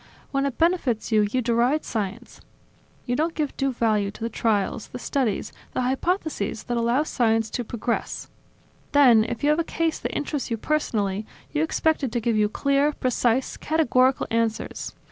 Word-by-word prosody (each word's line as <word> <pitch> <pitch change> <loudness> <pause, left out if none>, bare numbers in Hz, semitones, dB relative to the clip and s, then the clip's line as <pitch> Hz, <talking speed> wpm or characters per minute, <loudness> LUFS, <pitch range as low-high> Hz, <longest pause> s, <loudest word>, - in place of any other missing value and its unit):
When 275 0 +1
it 270 - -5
benefits 325 -11 +1
you, 210 -1 +4
you 255 +1 0
deride 240 +6 +2
science, 205 -4 -4 0.6
you 245 - 0
don't 325 +4 0
give 300 -3 -2
due 275 0 0
value 215 -4 +1
to 200 - -12
the 230 - -2
trials, 215 0 0
the - - -8
studies, 250 -4 -1 0.2
the - - 0
hypotheses 265 - -1
that 240 - -2
allow 235 +4 +2
science 225 -6 +1
to 245 - -2
progress; 235 +1 -3 0.7
then, 250 -6 +7
if 230 +3 -5
you 295 - +4
have 305 - +2
a - - +2
case 330 0 -1
that - - -3
interests 290 -2 -3
you 230 - -1
personally, 215 -7 -1 0.2
you 300 - 0
expect 320 -1 +1
it 260 - -1
to 240 - +1
give 230 0 0
you 210 -1 +3
clear, 280 +5 +2
precise, 255 -1 0
categorical 265 -4 +2
answers. 225 -1 -1
245 Hz, 175 wpm, -24 LUFS, 225-290 Hz, 0.7 s, then